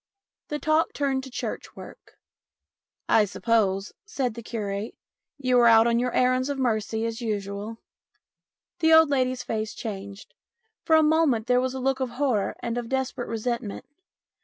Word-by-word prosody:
The 295 - -3
talk 310 +2 +1
turned 270 -2 -1
to - - -9
church 250 - -6
work. - - -13 0.4
" - - -62
I 220 - +5
suppose," 205 -2 0
said 265 - -2
the 235 - -8
curate, 210 -2 -4 0.2
" - - -65
you 250 -1 +5
are 240 - +6
out 225 0 +7
on 235 0 +2
your 250 0 0
errands 255 +2 +2
of 285 - -2
mercy 225 -3 -1
as 230 +1 -4
usual? 205 0 -4 0.6
" - - -65
The 320 -1 +4
old 320 -2 +6
lady's 255 -2 0
face 215 -1 -3
changed. 200 -2 -7 0.5
For 320 - +3
a 315 - +6
moment 300 -8 +2
there 250 0 +3
was 260 0 -2
a - - -3
look 265 +1 0
of 260 -1 -1
horror 255 -8 0
and 235 +1 -2
of 240 - -5
a - - -10
desperate 265 -1 -2
resentment. 230 -2 -3
240 Hz, 180 wpm, -25 LUFS, 220-265 Hz, 0.6 s, out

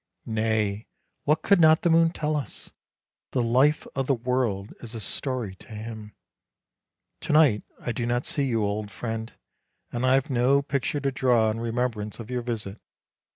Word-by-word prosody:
Nay, 110 -2 0 0.4
what 155 +2 +2
could 200 -3 +4
not 160 0 +6
the 175 - +3
moon 165 0 +5
tell 155 -2 -2
us? 140 -7 -5 0.6
The 125 - +2
life 130 +6 +3
of 135 -1 -2
the 135 - +3
world 120 -5 -1
is 120 -1 -8
a - - -4
story 120 -1 -3
to - - -16
him. 110 -1 -8 1.0
To 155 - -2
night 145 -9 +5 0.2
I 120 - -3
do 120 +1 -2
not 120 +1 0
see 140 - 0
you, 115 -4 +1
old 105 0 -2
friend; 110 +1 -5 0.6
and 120 +1 -3
I 130 +1 +5
have 135 +2 0
no 130 +3 +3
picture 140 +1 -1
to 140 -1 0
draw 120 -4 +3
in 110 - -4
remembrance 115 -3 -2
of 115 +1 -8
your 125 -1 -1
visit. 110 -4 -5
120 Hz, 175 wpm, -26 LUFS, 110-135 Hz, 1.0 s, not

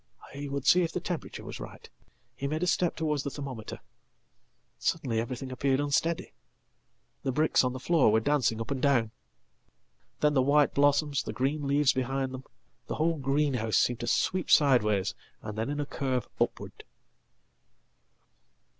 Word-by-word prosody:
He 140 +1 -6
would 140 -1 -4
see 180 - +6
if 165 -2 -1
the 180 - -2
temperature 175 -1 -5
was - - -7
right. - - -10 0.5
He 140 - -3
made 155 +4 -2
a - - +2
step 180 -1 +1
towards 150 -3 -1
thethermometer. 135 -5 -6 1.0
Suddenly 130 -9 -1
everything 125 +2 -5
appeared 130 +1 +1
unsteady. 145 +3 0 0.9
The 135 - -1
bricks 155 +3 +3
on 125 -1 0
thefloor 130 -1 +3
were 110 - +4
dancing 120 -3 +1
up 115 +4 -5
and 135 -2 -2
down. 120 -6 +2 1.1
Then 150 0 +3
the 135 - +4
white 145 +2 +3
blossoms, 145 0 +2
the - - -6
green 140 +2 -1
leavesbehind 135 -2 +1
them, 130 0 -8 0.4
the - - -3
whole 160 0 0
greenhouse, 135 -6 +1
seemed 120 -1 +2
to 120 - -4
sweep 185 -2 0
sideways, 105 -9 +4 0.3
and 105 -1 -6
then 110 +4 -2
in 145 - -3
acurve 135 -4 -2
upward. - - -2
140 Hz, 150 wpm, -29 LUFS, 125-150 Hz, 1.1 s, see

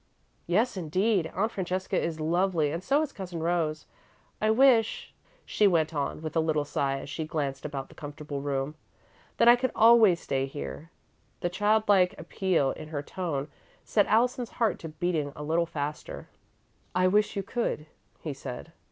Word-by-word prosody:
"Yes, 210 +6 +1
indeed. 185 +2 +1
Aunt 215 +5 0
Francesca 185 0 -2
is 165 -3 -1
lovely 165 -1 +1
and 170 +3 -4
so 285 +6 +2
is 295 - -4
Cousin 180 -4 -6
Rose. 165 -3 0 0.6
I 215 - +2
wish," 230 -1 +3 0.3
she 210 - +3
went 165 -3 +2
on, 145 +1 -3
with 155 - -5
a - - +4
little 155 -2 +1
sigh 140 -1 -1
as - - -9
she 145 +3 -4
glanced 145 -3 -3
about 140 -3 -4
the - - -16
comfortable 145 -1 -7
room, 140 0 -2 0.6
"that 235 - +4
I 240 - +10
could 255 +1 -1
always 220 -6 +6
stay 135 -4 -1
here." 70 - -7 0.5
The 175 - 0
child 210 +4 +2
like 185 -3 +4
appeal 165 -3 0
in 155 - -8
her 150 -2 -4
tone 155 -5 -3 0.3
set 205 -2 +2
Allison's 240 +2 +2
heart 225 -3 +1
to 165 - -7
beating 155 -2 -2
a 150 - -7
little 165 +3 +1
faster. 150 -2 -5 0.7
"I 185 0 +4
wish 210 +3 +2
you 200 - -2
could," 210 -8 -2 0.4
he 155 - -4
said. 135 +3 -8
170 Hz, 170 wpm, -28 LUFS, 150-205 Hz, 0.7 s, I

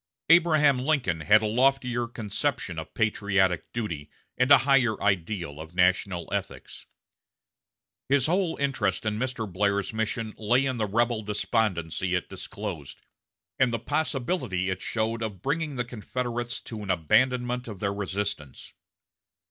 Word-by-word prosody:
Abraham 155 -5 +5
Lincoln 125 - 0
had 105 +7 +5
a - - +1
loftier 125 +1 +2
conception 110 - -3
of 80 - -8
patriotic 100 -5 +1
duty, 85 -11 -4 0.3
and 125 +1 +2
a 140 - +10
higher 125 -6 +3
ideal 90 -5 -1
of 80 +2 -11
national 90 0 +2
ethics. - - -5 1.2
His 135 -2 +3
whole 180 +1 +1
interest 115 -9 0
in 105 0 -1
Mr. 125 -3 -2
Blair's 100 +2 0
mission 110 0 -2
lay 120 +5 +2
in 130 -2 -1
the 110 -2 0
rebel 115 +2 +1
despondency 100 -4 -1
it 90 - -2
disclosed, 95 -5 -7 0.6
and 130 -2 +4
the 115 - 0
possibility 130 - -1
it 95 - -4
showed 115 0 -1
of 105 -5 -5
bringing 150 +1 -1
the 120 -1 -2
Confederates 120 +1 -4
to 110 -3 -7
an 100 - -7
abandonment 125 - +1
of 105 -5 -7
their 100 0 -1
resistance. 100 -8 -4
110 Hz, 140 wpm, -27 LUFS, 95-125 Hz, 1.2 s, a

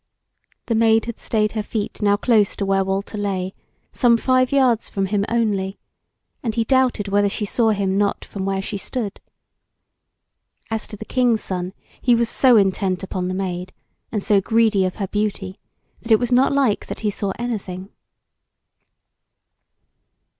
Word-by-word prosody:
The 230 - -1
Maid 225 0 +3
had 235 -1 -6
stayed 215 -2 0
her 220 - -2
feet 210 0 -4
now 205 -1 +3
close 215 -2 +2
to 200 - -2
where 195 0 +2
Walter 195 +2 -3
lay, 190 -2 -2 0.4
some 240 -2 +4
five 255 +1 +2
yards 255 -5 +2
from 195 -1 -1
him 200 +1 0
only, 205 -4 0 0.6
and 225 -3 -3
he 230 - +2
doubted 255 -4 +1
whether 200 0 +2
she 210 - -2
saw 225 +2 +2
him 200 -2 0
not 205 -1 0
from 195 - -6
where 195 0 -1
she 200 0 -4
stood. 220 -2 -4 1.5
As 220 -1 -2
to 210 - -9
the 220 - -8
King's 245 -3 +1
Son, 180 0 -4 0.3
he 245 -2 +4
was 235 0 +1
so 255 -3 +5
intent 190 -2 +1
upon 185 -1 -3
the 185 - -2
Maid, 185 -1 -4 0.4
and 210 -3 -2
so 205 -2 +3
greedy 220 -2 +2
of 185 - -3
her 200 -3 -3
beauty, 205 -2 -2 0.5
that 230 - -6
it 220 - +8
was 245 +2 -2
not 255 +2 +4
like 275 -7 +1
that - - -6
he 210 -2 0
saw 200 0 -2
anything. 195 -6 -5
210 Hz, 170 wpm, -21 LUFS, 195-230 Hz, 1.5 s, it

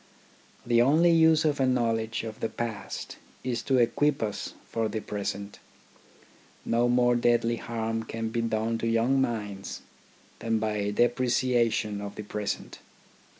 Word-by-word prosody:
The 120 -1 +4
only 155 +7 +5
use 160 -1 +5
of 145 -2 +1
a 135 - +3
knowledge 115 -3 0
of 110 -1 -7
the 115 - -1
past 115 -4 -5 0.3
is 120 -2 -2
to 135 - +1
equip 135 +3 +2
us 105 -2 -4
for 115 -1 -2
the 110 - -3
present. 100 -1 -5 1.1
No 120 +1 +2
more 120 0 +4
deadly 120 -1 +2
harm 115 -1 -3
can 115 0 -4
be 115 +1 -1
done 115 0 -1
to 115 - -1
young 115 +4 +2
minds 105 -6 -3 0.6
than 115 -1 0
by 105 -2 -1
depreciation 120 -2 +1
of 100 0 -6
the 105 - -6
present. 105 0 -4
115 Hz, 145 wpm, -27 LUFS, 110-120 Hz, 1.1 s, only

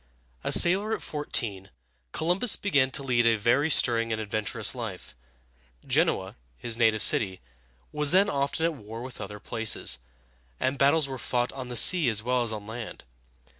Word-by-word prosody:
A - - -2
sailor 200 +5 +4
at 180 - -10
fourteen, 115 -10 -3 0.4
Columbus 180 - +3
began 140 -10 +1
to 140 +1 -1
lead 120 -3 +1
a 115 - +3
very 120 +8 +1
stirring 115 -5 +2
and 110 - -2
adventurous 110 +1 -1
life. 110 - -8 0.7
Genoa, - - -1 0.2
his 115 - -1
native 110 -2 +2
city, 95 -4 +2 0.5
was 150 -1 0
then 190 +3 +4
often 140 +3 -2
at 165 - 0
war 115 -3 -10
with 130 -1 -10
other 105 +1 -8
places, 110 - -1 0.6
and 135 +1 -2
battles 140 +2 +3
were 135 -2 -7
fought 120 +1 -2
on 130 -2 -7
the 125 - -7
sea 165 +1 +5
as 110 -2 +1
well 125 +1 0
as 120 -2 0
on 105 -2 -7
land. 115 +1 -8
120 Hz, 170 wpm, -26 LUFS, 110-145 Hz, 0.7 s, sea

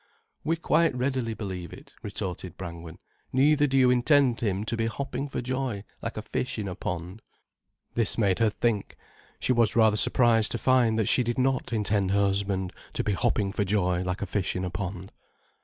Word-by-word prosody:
"We 165 +3 +1
quite 165 -2 +2
readily 125 -3 -1
believe 95 -5 -6
it," - - -13
retorted 95 -4 -5
Brangwen. 85 -2 -8 0.3
"Neither 145 +3 +4
do 135 0 +1
you 130 -1 +5
intend 125 0 +3
him 100 -3 -1
to 115 +2 -2
be 115 0 0
hopping 140 +4 -4
for 130 - -4
joy 130 -5 -2 0.2
like 115 - -5
a 110 - -4
fish 125 - -3
in 105 -2 -3
a 90 - -4
pond." 90 +3 -5 0.7
This 115 -3 +1
made 100 -4 +2
her 115 -1 +4
think. 105 -1 -1 0.4
She 130 - +1
was 115 -3 +3
rather 110 -2 +4
surprised 115 -1 +3
to - - -1
find 120 -2 +3
that 110 -3 +1
she - - +5
did 120 -1 -2
not 130 -1 0
intend 105 -3 +1
her 100 +1 +2
husband 100 -2 0 0.2
to - - -1
be 105 - 0
hopping 105 -1 0
for 105 0 0
joy 90 -3 +1
like 90 +2 -3
a - - -1
fish 95 0 -1
in 90 0 -2
a 90 - -4
pond. 95 +1 -5
110 Hz, 195 wpm, -27 LUFS, 95-125 Hz, 0.7 s, you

